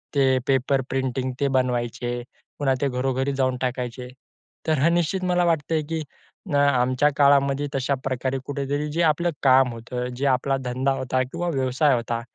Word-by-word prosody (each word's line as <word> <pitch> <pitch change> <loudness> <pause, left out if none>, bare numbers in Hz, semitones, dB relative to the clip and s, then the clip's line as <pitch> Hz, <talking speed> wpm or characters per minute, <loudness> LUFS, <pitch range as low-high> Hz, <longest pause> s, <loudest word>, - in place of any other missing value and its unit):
ते 135 -2 +4
paper 135 0 +2
printing 130 -1 -1
ते 140 - +2
बनवायचे 120 -1 -1 0.4
पुन्हा 135 -2 +2
ते 140 - +2
घरोघरी 130 +2 -1
जाऊन 130 -1 0
टाकायचे 125 -1 -3 0.6
तर 155 -3 +2
अ, - - +5
निश्चित 175 +2 0
मला 180 -1 +2
वाटते, 160 -1 +1
की 160 +2 -4 0.5
अ, - - +3
आमच्या 130 0 +3
काळामध्ये 140 0 +3
तशाप्रकारे 130 -1 -1
कुठेतरी 145 +1 -2
जे 165 +3 0
आपलं 165 +2 +2
काम 130 -1 +5
होतं, 125 +2 -5
जे 135 +3 -2
आपला 135 +1 +1
धंदा 130 +2 0
होता 130 0 0
किंवा 170 +7 -4
व्यवसाय 135 0 +2
होता 115 0 -2
135 Hz, 155 wpm, -24 LUFS, 125-145 Hz, 0.6 s, अ